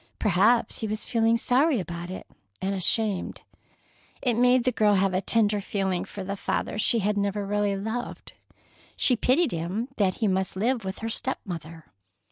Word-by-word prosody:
Perhaps 215 Hz, +4 st, +2 dB
he 220 Hz, -, -2 dB
was 215 Hz, +1 st, -3 dB
feeling 230 Hz, -1 st, +2 dB
sorry 260 Hz, +3 st, +2 dB
about 175 Hz, 0 st, -6 dB
it, 185 Hz, -, -7 dB, 0.3 s
and 195 Hz, +1 st, -1 dB
ashamed. 200 Hz, +1 st, -1 dB, 0.8 s
It 245 Hz, -, +1 dB
made 245 Hz, +2 st, +4 dB
the 255 Hz, -, +2 dB
girl 210 Hz, -3 st, +3 dB
have 195 Hz, 0 st, +2 dB
a 185 Hz, -, +1 dB
tenderer 210 Hz, -1 st, +2 dB
feeling 190 Hz, -2 st, -2 dB
for 200 Hz, -, -7 dB
the 200 Hz, +1 st, -4 dB
father 205 Hz, -, -2 dB
she 230 Hz, -, +2 dB
had 210 Hz, 0 st, +1 dB
never 200 Hz, 0 st, -1 dB
really 205 Hz, 0 st, 0 dB
loved. 220 Hz, +5 st, -5 dB, 0.6 s
She 250 Hz, -, +3 dB
pitied 275 Hz, +8 st, +2 dB
him 180 Hz, +9 st, -3 dB
that 190 Hz, -3 st, +2 dB
he 220 Hz, -, 0 dB
must 190 Hz, -1 st, 0 dB
live 230 Hz, +4 st, 0 dB
with 190 Hz, +1 st, -5 dB
her -, -, -1 dB
step 260 Hz, +3 st, -2 dB
mother. 165 Hz, -3 st, -7 dB
205 Hz, 175 wpm, -26 LUFS, 190-230 Hz, 0.8 s, made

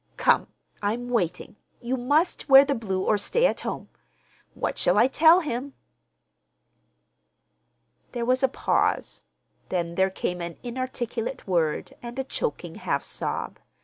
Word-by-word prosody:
Come, -, -, +3 dB, 0.3 s
I'm 230 Hz, +4 st, -2 dB
waiting. 180 Hz, -3 st, -2 dB, 0.2 s
You 245 Hz, +2 st, -2 dB
must 290 Hz, +7 st, 0 dB
wear 270 Hz, +1 st, +9 dB
the 280 Hz, -, 0 dB
blue 195 Hz, -6 st, -2 dB
or 210 Hz, +1 st, +2 dB
stay 485 Hz, -, +1 dB
at -, -, +1 dB
home. -, -, -5 dB, 0.7 s
What -, -, -3 dB
shall -, -, +3 dB
I 245 Hz, -, +6 dB
tell 325 Hz, +6 st, +6 dB
him?" 275 Hz, -2 st, -4 dB, 2.4 s
There 240 Hz, -2 st, -2 dB
was 255 Hz, +1 st, +2 dB
a 265 Hz, -, +5 dB
pause, 255 Hz, -, 0 dB, 0.5 s
then 170 Hz, -2 st, -2 dB
there 190 Hz, +2 st, +2 dB
came 180 Hz, -1 st, -3 dB
an 170 Hz, 0 st, -6 dB
inarticulate 245 Hz, 0 st, -4 dB
word 165 Hz, -5 st, 0 dB
and 240 Hz, +1 st, -8 dB
a 265 Hz, -, -1 dB
choking 450 Hz, -, -4 dB
half -, -, -1 dB
sob. -, -, -4 dB
240 Hz, 140 wpm, -25 LUFS, 190-270 Hz, 2.4 s, wear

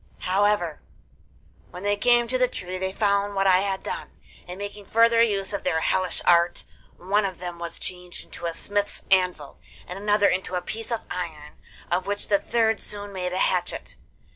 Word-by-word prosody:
However, 190 Hz, -4 st, +1 dB, 0.9 s
when 180 Hz, -, -9 dB
they 205 Hz, 0 st, +2 dB
came 240 Hz, +3 st, +3 dB
to 255 Hz, +2 st, 0 dB
the 250 Hz, -, +4 dB
tree 185 Hz, -6 st, -5 dB
they 190 Hz, 0 st, -1 dB
found 200 Hz, 0 st, +1 dB
what 195 Hz, 0 st, +2 dB
I 185 Hz, -1 st, +6 dB
had 195 Hz, -1 st, -2 dB
done, -, -, -5 dB, 0.4 s
and 180 Hz, +1 st, -7 dB
making 205 Hz, 0 st, -7 dB
further 230 Hz, 0 st, +5 dB
use 200 Hz, -4 st, +1 dB
of 200 Hz, -, -3 dB
their 160 Hz, -3 st, +1 dB
hellish 185 Hz, 0 st, 0 dB
art, 170 Hz, 0 st, +4 dB, 0.3 s
one 200 Hz, +4 st, +1 dB
of 190 Hz, -3 st, -3 dB
them 175 Hz, -1 st, -6 dB
was 170 Hz, -1 st, -4 dB
changed 180 Hz, -1 st, -6 dB
into 170 Hz, -, -6 dB
a 165 Hz, -, -4 dB
smith's 205 Hz, +2 st, -2 dB
anvil 180 Hz, -6 st, +1 dB, 0.3 s
and 180 Hz, +2 st, -6 dB
another 205 Hz, 0 st, +3 dB
into 185 Hz, 0 st, 0 dB
a 180 Hz, -, 0 dB
piece 225 Hz, +2 st, -6 dB
of 230 Hz, -, -1 dB
iron, 160 Hz, -4 st, -6 dB, 0.3 s
of 180 Hz, +2 st, 0 dB
which 205 Hz, 0 st, -2 dB
the 200 Hz, -1 st, +4 dB
third 225 Hz, -2 st, +1 dB
soon 205 Hz, -1 st, -6 dB
made 180 Hz, -1 st, -3 dB
a 185 Hz, -, -2 dB
hatchet. 180 Hz, -2 st, -1 dB
195 Hz, 190 wpm, -25 LUFS, 180-205 Hz, 0.9 s, I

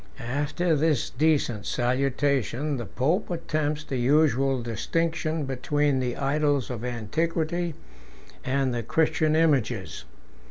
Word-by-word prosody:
After 145 Hz, +7 st, 0 dB
this 150 Hz, -3 st, +1 dB
decent 135 Hz, -7 st, +1 dB
salutation, 135 Hz, +2 st, 0 dB
the 120 Hz, -, -5 dB
pope 160 Hz, +11 st, 0 dB
attempts 155 Hz, -3 st, -2 dB
the 135 Hz, -, -3 dB
usual 135 Hz, -1 st, +2 dB
distinction 160 Hz, +6 st, -1 dB
between 135 Hz, +1 st, 0 dB
the 125 Hz, -2 st, -2 dB
idols 145 Hz, -1 st, +1 dB
of 120 Hz, -2 st, -5 dB
antiquity 160 Hz, +8 st, -1 dB, 0.7 s
and 130 Hz, -1 st, 0 dB
the 120 Hz, -, -1 dB
Christian 155 Hz, +4 st, +1 dB
images. 150 Hz, -8 st, +1 dB
145 Hz, 110 wpm, -26 LUFS, 125-155 Hz, 0.7 s, usual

